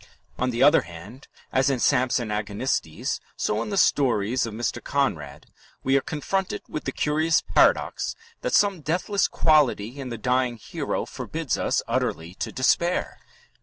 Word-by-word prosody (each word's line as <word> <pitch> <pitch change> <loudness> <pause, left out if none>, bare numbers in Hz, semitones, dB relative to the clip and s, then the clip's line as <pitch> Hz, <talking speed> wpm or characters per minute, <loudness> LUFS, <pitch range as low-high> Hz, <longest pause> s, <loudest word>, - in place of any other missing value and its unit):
On 125 - +1
the 120 +1 +1
other 145 - +6
hand, 90 - -12 0.3
as 130 +1 +3
in 135 - +1
Samson 125 -1 +1
Agonistes, 105 -5 -2 0.2
so 105 +1 0
in - - -4
the 200 - -2
stories 125 - +2
of 110 - -7
Mr. 120 +1 -3
Conrad 80 - -2 0.4
we 135 +1 +2
are 135 - +4
confronted 185 +7 -3
with 155 - -6
the 135 - -1
curious 155 +4 +1
paradox - - +2 0.3
that - - 0
some 200 -5 +3
deathless 180 +6 0
quality 140 -6 +2
in 130 -2 -5
the 115 - -5
dying 125 +1 0
hero - - -3
forbids - - -3
us - - 0
utterly 80 +2 -2
to - - -5
despair. 170 +7 +1
130 Hz, 155 wpm, -25 LUFS, 110-150 Hz, 0.4 s, other